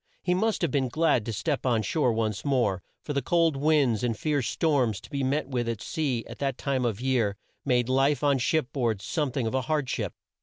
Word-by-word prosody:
He 180 - +2
must 215 +1 0
have 165 - +1
been 135 -2 +1
glad 150 -6 +2
to - - -1
step 100 -2 -2
on 120 -4 +1
shore 130 +3 +1
once 110 -2 -1
more, 120 -10 +1 0.2
for 145 - -4
the 140 - 0
cold 165 +2 +2
winds 140 -5 +2
and 115 -3 0
fierce 145 -5 0
storms 130 - +1
to - - -15
be 140 -1 -2
met 140 +2 0
with 120 -3 -2
at 115 -2 -3
sea, 135 -6 -2
at 115 - -10
that 135 -2 -1
time 135 -3 -1
of 115 -4 0
the 125 - -7
year, 115 -7 +1 0.3
made 125 -3 +2
life 135 +3 +2
on 140 -2 +3
ship 150 +2 0
board 115 -7 0
some 145 +4 -1
thing 130 -2 -1
of 110 - -2
a 130 - +1
hard 150 +1 -1
ship. - - -3
130 Hz, 235 wpm, -27 LUFS, 115-145 Hz, 0.3 s, on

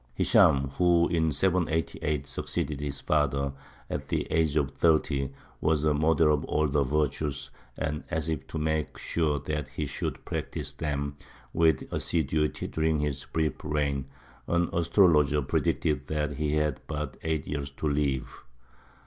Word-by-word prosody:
Hishām, 70 0 +4
who 85 -1 +5
in 80 -2 +2
788 80 -3 0
succeeded 70 0 -3
his 70 -1 -4
father, 70 -2 +1 0.3
at - - -4
the - - -1
age 80 -2 +2
of 70 -3 +1
thirty, 75 -4 +2 0.3
was 75 -1 +1
a 75 -1 +3
model 75 +1 +4
of 75 - 0
all 75 0 +1
the 70 +1 +1
virtues; 70 0 -1 0.3
and, 75 0 -2
as 80 0 -1
if 80 -3 -3
to - - -5
make 80 0 -1
sure 75 -3 0
that 75 -1 -3
he 65 - -4
should - - -4
practise - - -4
them 70 -2 -3 0.4
with 80 -4 +3
assiduity 75 -1 0
during 80 -1 0
his 70 -2 -2
brief 80 -1 -1
reign, 70 -3 0 0.4
an 85 0 +1
astrologer 80 -5 +4
predicted 70 +2 0
that 75 -2 -2
he 75 -1 0
had 75 -3 +1
but 75 -1 -4
eight 80 -3 -1
years 70 -2 -3
to 70 +3 -4
live. 70 -3 -1
75 Hz, 150 wpm, -28 LUFS, 70-80 Hz, 0.4 s, who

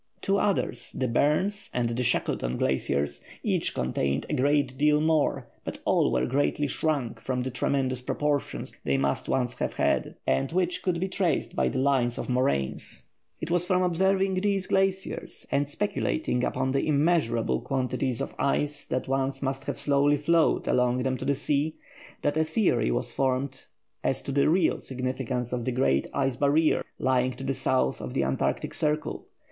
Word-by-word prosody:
Two 195 +1 +1
others, 150 - 0
the 130 - 0
Barnes 185 - +1
and 120 -1 +1
the 120 +2 -2
Shackleton 65 - 0
Glaciers, 70 +2 -1 0.2
each - - 0
contained 70 +2 -1
a - - -3
great 140 -1 +2
deal 150 +2 +3
more; 155 -1 +1 0.2
but - - -5
all - - +3
were 65 0 +1
greatly 145 - +1
shrunk 140 -4 -1
from 125 -1 -2
the 130 - -3
tremendous 130 0 0
proportions 145 +2 -2
they 70 0 +1
must 70 0 -1
once 125 -2 +1
have - - -1
had, - - 0
and 65 0 +1
which 180 0 0
could 180 -2 0
be 190 - 0
traced 185 -4 -1
by - - +2
the - - -3
lines 130 -3 +2
of - - -4
moraines. 70 - -1 0.4
It 160 - -4
was 175 0 +3
from 180 0 +1
observing 190 +2 +2
these 200 -2 +1
glaciers 190 0 -1
and 140 0 +1
speculating 155 -7 -1
upon 130 +1 0
the 135 +2 0
immeasurable 140 - +2
quantity 130 0 -1
of - - -4
ice 145 +1 0
that 130 - -2
once 135 +1 -1
must 135 0 -2
have - - -3
slowly 145 0 +3
flowed 160 +3 +2
along 125 0 +2
them 130 0 0
to - - -6
the 140 - +2
sea, 145 +3 0 0.5
that 145 +1 +1
a 160 - +4
theory 160 - +1
was - - -1
formed 135 0 -1 0.4
as - - +1
to - - -4
the 140 +1 +3
real 170 0 +2
significance 130 -1 -3
of 125 -1 -2
the 130 - -1
great 120 - +1
ice 135 -3 0
barrier 145 +3 +3
lying 130 0 +1
to 130 - -9
the 135 0 0
south 65 - 0
of 60 - -6
the 70 - +2
Antarctic 65 0 -1
Circle. 150 0 -1
135 Hz, 175 wpm, -27 LUFS, 125-155 Hz, 0.5 s, a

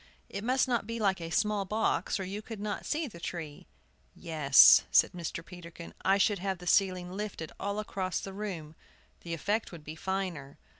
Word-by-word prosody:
It 200 - -5
must 260 +3 +2
not 235 -5 0
be 230 0 -3
like 195 -4 +1
a 165 - -5
small 210 +3 +1
box, 205 -2 0
or - - -2
you 195 +3 -5
could 225 -1 -8
not 205 0 -4
see 310 +1 0
the 205 -11 -9
tree. 160 -4 -6 0.5
"Yes," 150 -4 +7
said - - +5
Mr. 170 -2 -5
Peterkin, 170 -2 -10
"I 195 +1 +4
should 200 0 +2
have 190 0 -2
the 180 - -11
ceiling 185 -1 +2
lifted 195 -5 -5
all 200 +1 -2
across 190 -3 -2
the 195 - -7
room; 185 -7 -5 0.5
the 170 -1 -5
effect 210 +7 -1
would 170 -4 -10
be 155 +1 -8
finer." 180 -7 -4
190 Hz, 190 wpm, -30 LUFS, 170-210 Hz, 0.5 s, Yes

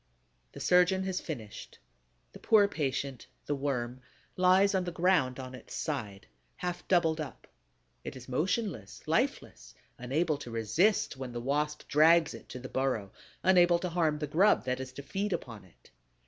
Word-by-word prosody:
The - - -9
surgeon 180 +1 +3
has 190 -1 -2
finished. 115 -10 -8 0.6
The - - -11
poor 210 -2 +5
patient, 140 - -3 0.2
the - - -1
Worm, 130 -3 -3 0.3
lies 185 +2 +4
on 190 -1 +1
the 175 - -3
ground 165 -7 +2
on 130 -1 -7
its 130 - -10
side, 110 -10 -4 0.3
half 180 -1 -5
doubled 165 -3 +2
up. 145 - -8 0.6
It - - -7
is 125 -1 -11
motionless, 160 - -2
lifeless, - - -2 0.2
unable 145 +5 0
to 125 - -8
resist 130 - +1
when 130 -2 -6
the 120 - -3
Wasp 150 +4 -2
drags 160 +2 +5
it - - -12
to - - -7
the 130 +1 -7
burrow, 125 -8 -1 0.3
unable 175 -2 +5
to 180 +1 -3
harm 160 -3 +1
the 150 - -3
grub 175 +3 +3
that 125 0 -1
is 130 -1 -6
to 140 - -8
feed 195 +6 -2
upon 110 -6 -6
it. 85 - -23
150 Hz, 165 wpm, -30 LUFS, 130-180 Hz, 0.6 s, poor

